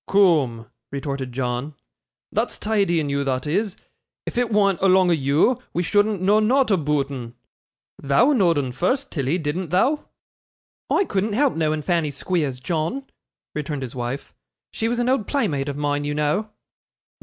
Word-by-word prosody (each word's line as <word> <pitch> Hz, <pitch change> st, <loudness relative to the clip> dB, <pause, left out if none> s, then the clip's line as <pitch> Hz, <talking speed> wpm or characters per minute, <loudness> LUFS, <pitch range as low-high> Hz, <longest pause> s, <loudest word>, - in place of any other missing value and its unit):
'Coom,' 150 Hz, -, +3 dB, 0.3 s
retorted 140 Hz, -2 st, -4 dB
John, 125 Hz, +3 st, -3 dB, 0.6 s
'thot's -, -, -1 dB
tidy 200 Hz, -6 st, +1 dB
in 150 Hz, -2 st, -2 dB
you, 140 Hz, 0 st, 0 dB
thot 130 Hz, -2 st, -1 dB
is. 195 Hz, +6 st, -1 dB, 0.5 s
If -, -, -5 dB
it 245 Hz, -1 st, +1 dB
wa'nt 200 Hz, -4 st, +2 dB
along 185 Hz, -1 st, +5 dB
o' -, -, +5 dB
you, 155 Hz, -, +2 dB
we 175 Hz, -, 0 dB
shouldn't 205 Hz, +1 st, +1 dB
know 205 Hz, +3 st, +4 dB
nought 250 Hz, +3 st, +3 dB
aboot 150 Hz, -6 st, +1 dB
'un. 120 Hz, -3 st, -7 dB, 0.7 s
Thou 230 Hz, -, +4 dB
know'd 180 Hz, -, +3 dB
'un 135 Hz, -3 st, -1 dB
first, 255 Hz, -, -1 dB
Tilly, 140 Hz, +2 st, 0 dB
didn't 165 Hz, +2 st, -3 dB
thou?' 255 Hz, -, +2 dB, 0.8 s
'I 395 Hz, -, +3 dB
couldn't 205 Hz, -, -1 dB
help 275 Hz, +4 st, +2 dB
knowing 155 Hz, -1 st, 0 dB
Fanny 165 Hz, -3 st, +1 dB
Squeers, 145 Hz, -2 st, -2 dB
John,' 165 Hz, -, -2 dB, 0.5 s
returned 150 Hz, -2 st, -3 dB
his 125 Hz, -, -6 dB
wife; 125 Hz, +2 st, -5 dB, 0.4 s
'she 225 Hz, -, -1 dB
was 240 Hz, +1 st, 0 dB
an 240 Hz, 0 st, 0 dB
old 255 Hz, -5 st, +1 dB
playmate 145 Hz, -, 0 dB
of 140 Hz, -, -4 dB
mine, 145 Hz, 0 st, 0 dB
you 145 Hz, 0 st, -2 dB
know. 150 Hz, +9 st, 0 dB
165 Hz, 165 wpm, -23 LUFS, 140-205 Hz, 0.8 s, along